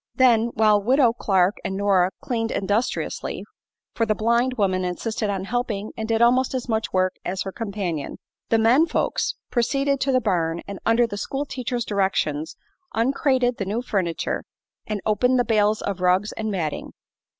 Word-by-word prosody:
Then, 235 Hz, -4 st, +4 dB
while 215 Hz, -1 st, +4 dB
Widow 250 Hz, +2 st, +4 dB
Clark 190 Hz, -3 st, +2 dB
and 190 Hz, -, -3 dB
Nora 195 Hz, -3 st, +3 dB
cleaned 225 Hz, -2 st, -2 dB
industriously 205 Hz, +4 st, -2 dB, 0.5 s
for 230 Hz, -, 0 dB
the 215 Hz, -, +2 dB
blind 235 Hz, +4 st, +1 dB
woman 190 Hz, -4 st, +1 dB
insisted 210 Hz, +4 st, -2 dB
on 195 Hz, -2 st, -2 dB
helping 215 Hz, -1 st, -2 dB
and 220 Hz, -, -4 dB
did 225 Hz, 0 st, +2 dB
almost 255 Hz, +2 st, +3 dB
as 255 Hz, -1 st, -3 dB
much 220 Hz, -2 st, -1 dB
work 185 Hz, 0 st, +1 dB
as 185 Hz, +1 st, -2 dB
her 195 Hz, -, -5 dB
companion 195 Hz, -9 st, -4 dB, 0.3 s
the 225 Hz, -, +4 dB
"men 245 Hz, +9 st, +4 dB
folks" -, -, -1 dB, 0.2 s
proceeded 275 Hz, +3 st, +1 dB
to 270 Hz, -, +1 dB
the 255 Hz, -, +4 dB
barn 170 Hz, -6 st, 0 dB
and 200 Hz, -1 st, -6 dB
under 230 Hz, +1 st, +4 dB
the 205 Hz, -3 st, -5 dB
school 270 Hz, +7 st, -3 dB
teacher's 245 Hz, -3 st, -3 dB
directions 180 Hz, -6 st, -1 dB, 0.4 s
uncrated 255 Hz, +1 st, +1 dB
the 195 Hz, -, -2 dB
new 215 Hz, +5 st, -2 dB
furniture 185 Hz, -8 st, -2 dB, 0.4 s
and 210 Hz, -2 st, -3 dB
opened 250 Hz, +4 st, +2 dB
the 245 Hz, -, +2 dB
bales 215 Hz, -1 st, +2 dB
of 195 Hz, -2 st, -3 dB
rugs 185 Hz, +3 st, +2 dB
and 220 Hz, -1 st, -4 dB
matting. 170 Hz, -7 st, -3 dB
220 Hz, 170 wpm, -23 LUFS, 195-245 Hz, 0.5 s, Then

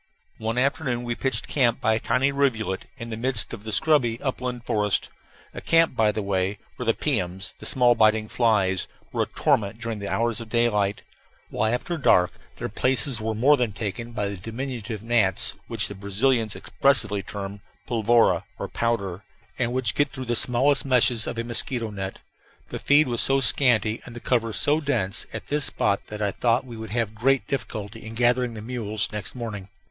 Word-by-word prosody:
One 110 Hz, +2 st, -2 dB
afternoon 130 Hz, -2 st, 0 dB
we 120 Hz, -1 st, -2 dB
pitched 130 Hz, +2 st, -1 dB
camp 120 Hz, -5 st, +2 dB
by 110 Hz, -, +2 dB
a 110 Hz, -, +1 dB
tiny 130 Hz, +5 st, +1 dB
rivulet, 115 Hz, -8 st, 0 dB
in 115 Hz, -1 st, -7 dB
the 110 Hz, -, -3 dB
midst 125 Hz, -1 st, 0 dB
of 110 Hz, -3 st, -7 dB
the 110 Hz, -, -5 dB
scrubby 120 Hz, -, +2 dB
upland 125 Hz, -3 st, -3 dB
forest; 105 Hz, -2 st, 0 dB, 0.4 s
a -, -, -7 dB
camp, 165 Hz, -4 st, +4 dB
by 110 Hz, -2 st, +3 dB
the 105 Hz, -, -3 dB
way, 95 Hz, 0 st, -1 dB, 0.2 s
where 125 Hz, -, -6 dB
the 115 Hz, -, +3 dB
piums, 95 Hz, -9 st, -2 dB
the -, -, -7 dB
small, 125 Hz, -2 st, +4 dB
biting 110 Hz, -1 st, +3 dB
flies, 105 Hz, -6 st, +1 dB, 0.2 s
were -, -, -1 dB
a -, -, +2 dB
torment 105 Hz, +1 st, 0 dB
during 115 Hz, -3 st, -4 dB
the 100 Hz, -, -4 dB
hours 115 Hz, -1 st, 0 dB
of 115 Hz, -, -9 dB
daylight, 105 Hz, -4 st, +1 dB, 0.5 s
while 110 Hz, -, 0 dB
after 160 Hz, +7 st, -2 dB
dark 90 Hz, -10 st, +4 dB, 0.2 s
their -, -, -4 dB
places 130 Hz, -2 st, +1 dB
were 110 Hz, 0 st, -2 dB
more 140 Hz, +7 st, +5 dB
than 120 Hz, -5 st, -1 dB
taken 115 Hz, +3 st, -5 dB
by 105 Hz, -3 st, -2 dB
the 100 Hz, 0 st, -5 dB
diminutive 115 Hz, +1 st, -5 dB
gnats 115 Hz, -6 st, +2 dB
which -, -, -1 dB
the -, -, -7 dB
Brazilians 110 Hz, +3 st, 0 dB
expressively 110 Hz, -7 st, +1 dB
term 100 Hz, 0 st, -7 dB, 0.3 s
"polvora," 115 Hz, -1 st, +3 dB
or -, -, -4 dB
powder, 100 Hz, -5 st, -2 dB, 0.4 s
and 120 Hz, -2 st, 0 dB
which 125 Hz, -3 st, +1 dB
get 145 Hz, -1 st, +2 dB
through 130 Hz, -1 st, -6 dB
the 120 Hz, 0 st, -1 dB
smallest 130 Hz, +5 st, +3 dB
meshes 125 Hz, -3 st, +3 dB
of -, -, -4 dB
a 115 Hz, -, -1 dB
mosquito 120 Hz, -1 st, -2 dB
net. 95 Hz, -1 st, -5 dB, 0.5 s
The -, -, -5 dB
feed 145 Hz, +1 st, +4 dB
was 120 Hz, -2 st, 0 dB
so 135 Hz, 0 st, +4 dB
scanty, 115 Hz, -3 st, +2 dB
and 120 Hz, -, -10 dB
the -, -, -6 dB
cover 115 Hz, -2 st, 0 dB
so 145 Hz, +7 st, +2 dB
dense, 115 Hz, -10 st, -1 dB
at -, -, -6 dB
this 145 Hz, -1 st, 0 dB
spot 100 Hz, -, 0 dB
that 105 Hz, 0 st, -5 dB
I 100 Hz, -, +1 dB
thought 120 Hz, +4 st, +1 dB
we 120 Hz, -2 st, -9 dB
would 110 Hz, -1 st, -7 dB
have 110 Hz, -1 st, -1 dB
great 130 Hz, +4 st, +2 dB
difficulty 115 Hz, -4 st, -5 dB
in 110 Hz, +1 st, -8 dB
gathering 120 Hz, 0 st, +2 dB
the 105 Hz, -, -7 dB
mules 110 Hz, -3 st, -2 dB
next 105 Hz, 0 st, -5 dB
morning. 105 Hz, -6 st, -6 dB
115 Hz, 195 wpm, -25 LUFS, 105-125 Hz, 0.5 s, more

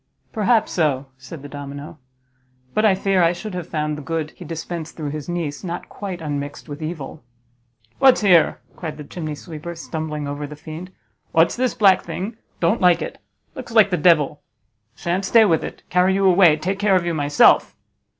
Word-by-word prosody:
"Perhaps 225 Hz, +1 st, +2 dB
so," 145 Hz, -5 st, +1 dB
said 135 Hz, +3 st, -10 dB
the -, -, -7 dB
domino; 145 Hz, +2 st, -8 dB, 0.7 s
"but 215 Hz, -, +1 dB
I 210 Hz, -3 st, +5 dB
fear 195 Hz, -1 st, +1 dB
I 170 Hz, 0 st, +4 dB
should 210 Hz, +3 st, -7 dB
have 180 Hz, -2 st, -5 dB
found 150 Hz, -1 st, -2 dB
the 150 Hz, -, -7 dB
good 160 Hz, +1 st, -3 dB
he -, -, -12 dB
dispensed 165 Hz, 0 st, -6 dB
through 150 Hz, -3 st, -4 dB
his 150 Hz, +2 st, -6 dB
niece 165 Hz, -4 st, -3 dB
not 175 Hz, -1 st, -5 dB
quite 190 Hz, -4 st, -6 dB
unmixed 145 Hz, 0 st, -5 dB
with 145 Hz, +1 st, -8 dB
evil!" 155 Hz, -3 st, -6 dB, 0.8 s
"What's 265 Hz, -3 st, +6 dB
here?" 180 Hz, -6 st, +4 dB, 0.2 s
cried 155 Hz, -4 st, -6 dB
the 150 Hz, -, -7 dB
chimney 155 Hz, 0 st, -6 dB
sweeper, 165 Hz, +2 st, -8 dB
stumbling 155 Hz, -2 st, -5 dB
over 145 Hz, +1 st, -4 dB
the 150 Hz, -, -9 dB
fiend, 160 Hz, +4 st, -9 dB, 0.4 s
"what's 165 Hz, +1 st, +4 dB
this 255 Hz, 0 st, 0 dB
black 195 Hz, -5 st, +5 dB
thing? 205 Hz, +5 st, -5 dB, 0.2 s
Don't 170 Hz, 0 st, +1 dB
like 180 Hz, -2 st, +4 dB
it; -, -, -8 dB, 0.3 s
looks 255 Hz, -4 st, -8 dB
like 215 Hz, -3 st, +5 dB
the -, -, +3 dB
devil. 150 Hz, -4 st, +3 dB, 0.5 s
You -, -, -20 dB
shan't 180 Hz, +3 st, -1 dB
stay 225 Hz, +3 st, +6 dB
with 165 Hz, -6 st, +2 dB
it; -, -, -8 dB
carry 180 Hz, +2 st, +3 dB
you 195 Hz, 0 st, +1 dB
away; 180 Hz, -4 st, +6 dB
take 190 Hz, +5 st, -3 dB
care 205 Hz, -2 st, +3 dB
of 180 Hz, -2 st, +1 dB
you 170 Hz, -, -1 dB
myself." 145 Hz, -1 st, +4 dB
170 Hz, 190 wpm, -21 LUFS, 150-190 Hz, 0.8 s, What's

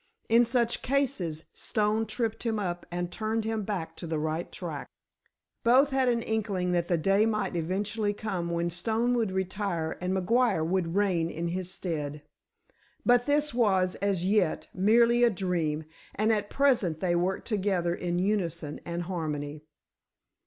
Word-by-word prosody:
In 235 Hz, +1 st, +6 dB
such 235 Hz, 0 st, +1 dB
cases 245 Hz, -, -1 dB
Stone 215 Hz, +1 st, 0 dB
tripped 225 Hz, 0 st, -2 dB
him 225 Hz, -2 st, -1 dB
up 175 Hz, -4 st, -3 dB
and 175 Hz, 0 st, -3 dB
turned 220 Hz, +3 st, -1 dB
him 220 Hz, -1 st, -1 dB
back 180 Hz, -6 st, -4 dB
to 170 Hz, -, -6 dB
the 160 Hz, -1 st, -1 dB
right 155 Hz, +2 st, -2 dB
track. -, -, -5 dB, 0.8 s
Both 260 Hz, +4 st, +5 dB
had 265 Hz, -1 st, +2 dB
an 235 Hz, -1 st, +1 dB
inkling 200 Hz, -5 st, -1 dB
that 175 Hz, -1 st, +1 dB
the 175 Hz, -, +2 dB
day 195 Hz, +6 st, +3 dB
might 210 Hz, -5 st, -1 dB
eventually 205 Hz, +5 st, -1 dB
come 195 Hz, -5 st, -3 dB
when 170 Hz, 0 st, -1 dB
Stone 225 Hz, +8 st, 0 dB
would 225 Hz, -5 st, +1 dB
retire 190 Hz, -3 st, -2 dB
and 180 Hz, +1 st, -1 dB
McGuire 190 Hz, -1 st, +2 dB
would 175 Hz, 0 st, 0 dB
reign 185 Hz, -5 st, +2 dB
in 170 Hz, +1 st, -3 dB
his 180 Hz, +1 st, -3 dB
stead. 150 Hz, -5 st, -4 dB, 0.8 s
But 245 Hz, +1 st, +4 dB
this 295 Hz, 0 st, +2 dB
was, 190 Hz, -6 st, +2 dB
as 195 Hz, -3 st, 0 dB
yet, 195 Hz, -4 st, +1 dB
merely 235 Hz, +5 st, +4 dB
a 240 Hz, -, +7 dB
dream, 170 Hz, -6 st, -1 dB, 0.3 s
and 215 Hz, +2 st, +2 dB
at 205 Hz, -1 st, -1 dB
present 235 Hz, -, +2 dB
they 175 Hz, -1 st, +1 dB
worked 180 Hz, +2 st, -1 dB
together 190 Hz, -5 st, 0 dB
in 175 Hz, 0 st, -2 dB
unison 180 Hz, -6 st, -1 dB
and 170 Hz, 0 st, -3 dB
harmony. 155 Hz, -4 st, -4 dB
190 Hz, 160 wpm, -28 LUFS, 170-225 Hz, 0.8 s, a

